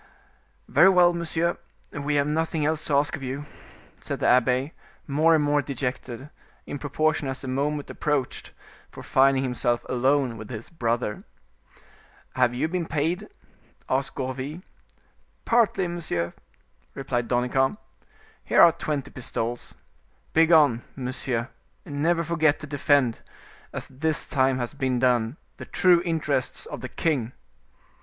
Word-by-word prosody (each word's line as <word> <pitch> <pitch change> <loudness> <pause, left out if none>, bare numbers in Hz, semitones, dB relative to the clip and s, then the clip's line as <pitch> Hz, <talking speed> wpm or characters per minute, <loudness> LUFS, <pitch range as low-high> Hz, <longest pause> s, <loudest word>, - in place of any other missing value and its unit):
"Very 190 - +6
well, 180 -2 +5
monsieur, 170 0 -1 0.3
we 145 0 -2
have 140 -1 +3
nothing 160 +1 0
else 155 0 0
to 145 - +1
ask 145 +4 +2
of 155 - -10
you," 135 +2 -4 0.6
said - - -4
the - - -1
abbe, 125 +4 +3 0.3
more 155 +3 +4
and 155 - +2
more 145 0 +2
dejected, 130 0 -5 0.3
in 145 - -6
proportion 155 0 0
as 135 0 -4
the - - -6
moment 145 +3 -1
approached 145 -4 -2 0.4
for - - -11
finding 135 0 +3
himself 125 -2 0
alone 130 -1 +1
with 110 - -9
his 115 +2 -8
brother. 115 -7 -2 1.1
"Have 125 -1 +2
you 130 - 0
been 170 0 -2
paid?" 160 +4 -1 0.6
asked 130 +1 -1
Gourville. 135 +6 -4 0.8
"Partly, 230 -6 +3
monsieur," 160 - -2 0.6
replied 125 -3 -2
Danicamp. 130 +6 +1 0.7
"Here - - +4
are 170 - +8
twenty 155 -4 -4
pistols. 120 -1 -4 0.6
Begone, 160 -7 +5
monsieur, 125 -2 -3 0.4
and 145 -4 -5
never 170 +1 +2
forget 160 -3 +2
to - - -5
defend, 140 -4 +2 0.5
as - - -6
this 155 +4 -3
time 130 -2 +2
has 120 0 -3
been 130 -3 -1
done, 120 +1 +1 0.2
the - - -8
true 180 -2 +4
interests 155 -6 -1
of - - -7
the 125 - -6
king." 130 -7 -1
140 Hz, 135 wpm, -25 LUFS, 125-160 Hz, 1.1 s, are